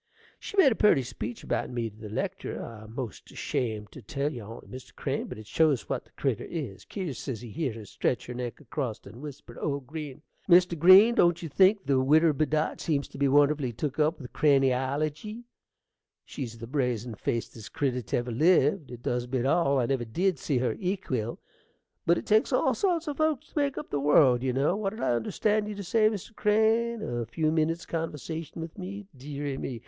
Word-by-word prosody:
She 405 - -8
made 300 -9 +7
a - - +1
purty 175 -12 +4
speech 115 -1 -6
about - - -1
me 120 -2 -2
to 105 - -11
the 110 -1 -9
lectur': 105 - -3
I'm 110 -1 -9
'most 125 -4 -6
ashamed 110 -4 -3
to 140 - -11
tell 140 +7 -2
you 120 - -6
on't, 110 +3 -10
Mr. 130 0 -10
Crane, - - -2
but - - -7
it 110 - -10
shows 150 0 +2
what - - -3
the - - -27
critter - - -1
is. 100 - -5
Kier 180 -9 -4
says 120 -2 -5
he 120 -3 -9
heered 140 -6 -2
her 110 -2 -8
stretch 125 - -1
her 125 - -6
neck 125 -1 -5
acrost 130 -4 -4
and 120 - -11
whisper 145 -5 -9
to - - -11
old 140 -2 -2
Green, 150 0 -7 0.3
"Mr. 175 0 +6
Green, 185 +8 +8
don't 175 -5 +3
you 165 - -4
think 195 +6 +4
the 135 -2 +3
widder 155 +4 +5
Bedott 155 +2 0
seems 145 -3 0
to - - -11
be 140 - +3
wonderfully 145 -1 +3
took 135 +5 -4
up 155 +3 +2
with 125 -4 -10
crainiology?" 145 - +1 0.8
She's 120 -5 -6
the 115 - -7
brazin' 125 -3 -1
facedest 115 0 -4
critter 135 -5 0
't 115 - -2
ever 120 0 -2
lived; 150 - +3
it 120 -1 -10
does 120 0 -1
beat 125 0 -1
all; 140 -1 +3
I 125 - +2
never 130 0 0
did 175 +7 0
see 140 - 0
her 125 0 +1
equill. 180 - -2 0.7
But 170 +1 +5
it - - -5
takes 215 +1 +3
all - - +3
sorts 345 -5 0
o' 295 - -1
folks 310 -2 0
to - - -27
make 280 -1 0
up 300 - -6
the 145 - 0
world, 140 -3 +5
you 130 0 0
know. 140 +8 +1
What 205 0 -2
did 230 - -7
I - - +2
understand 210 - 0
you 210 - -5
to 200 - -6
say, 215 +3 +3
Mr. 215 +1 -6
Crane? 220 +2 +2
a 120 -2 -3
few 155 +6 0
minnits' 160 +1 0
conversation 165 0 -4
with 165 +3 -9
me? 200 +2 -6
Deary 140 +1 -5
me! 125 -3 -4
145 Hz, 210 wpm, -28 LUFS, 125-175 Hz, 0.8 s, Green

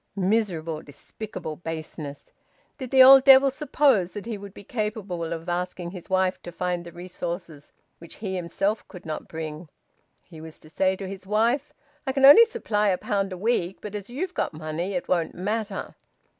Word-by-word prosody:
Miserable, 185 -6 0
despicable 155 +2 -8
baseness! 160 -3 -7 0.5
Did 260 -2 -5
the 260 0 +8
old 265 0 +9
devil 270 0 +8
suppose 270 -10 +2
that 205 - -7
he 230 -1 -4
would 200 -1 -9
be 200 - -13
capable 210 -6 -3
of 165 0 -5
asking 175 0 -3
his 180 -3 -10
wife 185 0 +1
to 175 - -8
find 180 0 -2
the 170 - -10
resources 175 -3 -7 0.3
which 170 - -11
he 195 -3 -4
himself 195 +4 -2
could 180 - -12
not 155 -1 -5
bring? 160 0 -7 0.5
He 160 -3 -13
was 160 -1 -10
to 155 - -16
say 190 +2 +1
to 195 0 -7
his 190 0 -9
wife: 235 +7 +1 0.4
"I 265 - 0
can 270 0 +4
only 295 +12 +10
supply 225 - -1
a 185 -2 +2
pound 195 0 -1
a 185 - -5
week, 190 -3 0
but 210 - -8
as 205 0 -6
you've 355 +9 -4
got - - -2
money 160 +5 -4
it 180 - -3
won't 170 -3 0
matter." 205 +2 -3
190 Hz, 185 wpm, -25 LUFS, 170-220 Hz, 0.5 s, only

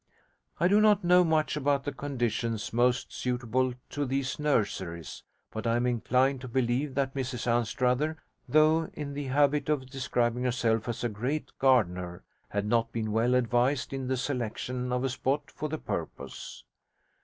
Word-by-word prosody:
I 175 - +4
do 205 +3 +5
not 210 -2 +4
know 180 +1 +6
much 160 -3 +1
about 140 -1 +1
the 145 - -2
conditions 120 -5 -2
most 125 +1 +2
suitable 125 0 -1 0.2
to 145 - -1
these 135 +1 -2
nurseries, 95 - -1 0.3
but 110 +1 -4
I 115 - +2
am 120 +1 +1
inclined 125 +2 +2
to 130 - -6
believe 130 +3 0
that 135 -1 0
Mrs 130 -3 -3
Anstruther, 125 +6 +1 0.3
though 155 +2 +4
in 145 -2 -5
the 145 0 -4
habit 145 +2 +2
of 130 -4 -1
describing 125 -2 0
herself 115 -2 +1
as 120 - -3
'a 120 - +1
great 125 +9 -3
gardener', 90 -10 +2 0.3
had 100 0 -1
not 115 +1 +1
been 110 -2 -2
well 115 +3 +2
advised 125 +2 +1
in 135 -1 -3
the 130 0 0
selection 125 -1 -3
of 125 +1 0
a 135 - +1
spot 135 +3 -1
for 155 - -4
the 155 - -2
purpose. - - -6
125 Hz, 165 wpm, -29 LUFS, 120-140 Hz, 0.3 s, know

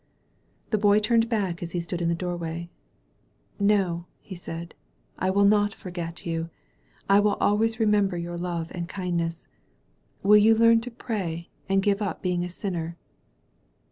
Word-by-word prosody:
The 215 - +2
Boy 205 0 +5
turned 225 +2 +3
back 195 -7 -1
as 170 -1 -6
he 175 - 0
stood 170 +1 -4
in 170 - +1
the 170 - +1
door 175 +1 -3
way. 170 0 -5 0.9
No," 190 -4 +1
he 195 - -10
said. 170 -1 -7 0.5
"I 185 - +1
will 200 +1 +4
not 205 +1 +3
forget 170 -2 -6
you. 165 -1 -2 0.6
I 195 +1 +6
will 205 0 +3
always 220 +2 +1
remember 205 -4 +2
your 175 0 -4
love 170 -1 -3
and 170 -1 -5
kindness. 170 -3 -3 0.8
Will 210 +1 +7
you 220 +2 +6
leam 230 0 +5
to 245 - -6
pray, 190 -9 -4 0.2
and 195 0 +3
give 200 +1 +2
up 200 - -3
being 180 -1 0
a 180 - -4
sinner?" 170 -3 -4
185 Hz, 165 wpm, -26 LUFS, 170-210 Hz, 0.9 s, Will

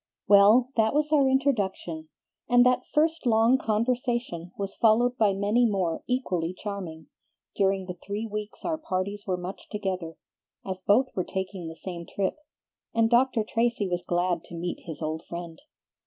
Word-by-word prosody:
Well, 210 +6 +6
that 220 +3 +3
was 300 0 +1
our 280 -3 +4
introduction, 200 - -1 0.4
and 245 0 +6
that 250 0 +2
first 315 -1 +1
long 230 +3 +4
conversation 230 -6 -1
was 195 -1 -4
followed 240 +2 +3
by 215 -4 +3
many 205 +5 +2
more 185 -5 -1
equally 185 -9 -1
charming, 180 -7 -6 0.5
during 195 -1 +1
the 180 - -5
three 205 +3 -3
weeks 210 -1 -6
our 320 -2 -1
parties 200 -4 -3
were 185 -1 0
much 180 +2 -8
together, 185 -6 -4 0.5
as 185 -1 -5
both 235 +8 +3
were 185 - 0
taking 190 -2 -5
the 160 - -7
same 170 0 -7
trip, 195 +5 -2 0.6
and 225 0 +3
Dr. 240 -2 +3
Tracy 230 -1 0
was 175 -1 -1
glad 175 -1 0
to 175 - -10
meet 175 +1 -4
his 160 -1 -6
old 155 +1 -3
friend. 170 -1 -7
200 Hz, 160 wpm, -27 LUFS, 180-240 Hz, 0.6 s, Well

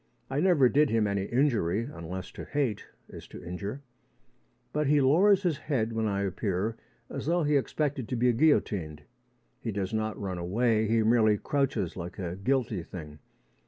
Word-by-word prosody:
I 135 - 0
never 165 -7 +5
did 145 +3 +3
him 110 -1 +2
any 100 -1 -1
injury 115 - +1
unless 95 - -7
to - - -8
hate 135 -8 -2 0.2
is - - -11
to - - -11
injure. 100 +10 -5 0.9
But 150 -1 0
he 150 +1 +4
lowers 185 +9 +4
his 170 -6 0
head 115 -7 -1
when 110 -1 0
I 100 -1 -1
appear 100 +2 -1 0.3
as - - -6
though 170 +1 +2
he 150 0 +2
expected 140 -2 -1
to 125 - -1
be 120 +1 +3
guillotined. 100 - +1 0.6
He 115 - -3
does 100 0 -3
not 110 -1 -2
run 95 -3 -4
away: 110 +5 +1
he 115 +1 +2
merely 110 -2 +4
crouches 135 - -1
like 90 0 -7
a 90 -2 -4
guilty 115 -1 0
thing. 75 -3 -9
115 Hz, 170 wpm, -28 LUFS, 95-140 Hz, 0.9 s, never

